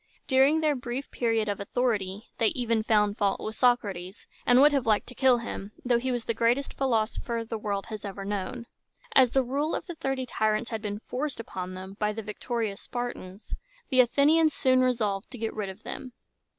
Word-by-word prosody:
During 275 Hz, +4 st, +4 dB
their 305 Hz, -2 st, +2 dB
brief 250 Hz, +1 st, -5 dB
period 225 Hz, -2 st, +1 dB
of 205 Hz, -1 st, -2 dB
authority 205 Hz, -2 st, -1 dB
they 225 Hz, -, +4 dB
even 230 Hz, -1 st, 0 dB
found 210 Hz, -1 st, +2 dB
fault 200 Hz, -2 st, +1 dB
with 215 Hz, 0 st, -5 dB
Socrates, 205 Hz, -7 st, 0 dB, 0.2 s
and 245 Hz, 0 st, +6 dB
would 295 Hz, +2 st, +7 dB
have 275 Hz, -5 st, 0 dB
liked 215 Hz, -2 st, +3 dB
to -, -, -9 dB
kill 255 Hz, -1 st, +4 dB
him, 215 Hz, -3 st, -6 dB
though 245 Hz, -1 st, +3 dB
he 260 Hz, +2 st, -1 dB
was 245 Hz, -2 st, -2 dB
the 230 Hz, -, 0 dB
greatest 240 Hz, +5 st, +1 dB
philosopher 230 Hz, -2 st, 0 dB
the 225 Hz, -1 st, -4 dB
world 200 Hz, -2 st, -2 dB
has 215 Hz, -2 st, -7 dB
ever 195 Hz, -1 st, -6 dB
known. 205 Hz, +4 st, -3 dB, 0.5 s
As 260 Hz, -2 st, +6 dB
the 265 Hz, +2 st, +2 dB
rule 280 Hz, +5 st, -1 dB
of -, -, -4 dB
the 350 Hz, -, -6 dB
Thirty 270 Hz, -4 st, -2 dB
Tyrants 220 Hz, -1 st, 0 dB
had 220 Hz, -1 st, -3 dB
been 205 Hz, -1 st, -4 dB
forced 275 Hz, 0 st, -3 dB
upon 185 Hz, -4 st, -5 dB
them 190 Hz, +1 st, -8 dB
by 210 Hz, 0 st, +1 dB
the 225 Hz, +1 st, -5 dB
victorious 210 Hz, 0 st, -3 dB
Spartans, 240 Hz, -5 st, -6 dB, 0.4 s
the 260 Hz, -3 st, +2 dB
Athenians 300 Hz, +5 st, +4 dB
soon 255 Hz, -1 st, +3 dB
resolved 215 Hz, -6 st, 0 dB
to 255 Hz, -, -9 dB
get 225 Hz, -1 st, -3 dB
rid 210 Hz, -3 st, -3 dB
of 190 Hz, +3 st, -10 dB
them. 255 Hz, -, -7 dB
230 Hz, 200 wpm, -28 LUFS, 210-255 Hz, 0.5 s, would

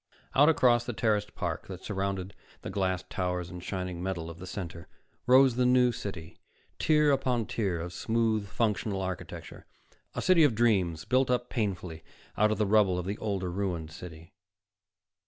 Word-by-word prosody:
Out 145 Hz, +3 st, +6 dB
across 120 Hz, -6 st, +4 dB
the 120 Hz, -, -4 dB
terraced 105 Hz, -2 st, 0 dB
park 85 Hz, -5 st, -3 dB
that 95 Hz, -1 st, -8 dB
surrounded 95 Hz, -2 st, -3 dB, 0.3 s
the -, -, -5 dB
glassed 95 Hz, -2 st, -1 dB
towers 90 Hz, -1 st, -2 dB
and 90 Hz, 0 st, -8 dB
shining 90 Hz, -3 st, -4 dB
metal 85 Hz, -3 st, -3 dB
of 85 Hz, -, -12 dB
the 90 Hz, -, -8 dB
Center 90 Hz, -2 st, -6 dB, 0.4 s
rose 130 Hz, -1 st, +6 dB
the 125 Hz, -, +3 dB
New 125 Hz, -1 st, +5 dB
City, 95 Hz, -7 st, -7 dB, 0.4 s
tier 150 Hz, -1 st, +4 dB
upon 125 Hz, -4 st, +1 dB
tier 95 Hz, -7 st, -1 dB
of 85 Hz, +2 st, -5 dB
smooth, 110 Hz, 0 st, 0 dB
functional 105 Hz, -1 st, -1 dB
architecture, 95 Hz, -1 st, -7 dB, 0.5 s
a -, -, -2 dB
city 185 Hz, -3 st, +5 dB
of 140 Hz, -7 st, +4 dB
dreams 95 Hz, -8 st, +2 dB
built 130 Hz, 0 st, +2 dB
up 125 Hz, 0 st, 0 dB
painfully 90 Hz, -7 st, -3 dB, 0.3 s
out 105 Hz, 0 st, +3 dB
of 110 Hz, -, 0 dB
the 105 Hz, -, +2 dB
rubble 100 Hz, -3 st, +3 dB
of 90 Hz, -, -3 dB
the 100 Hz, +3 st, -4 dB
older, 95 Hz, -4 st, -2 dB
ruined 90 Hz, -4 st, -3 dB
city. 80 Hz, 0 st, -11 dB
100 Hz, 170 wpm, -29 LUFS, 90-115 Hz, 0.5 s, Out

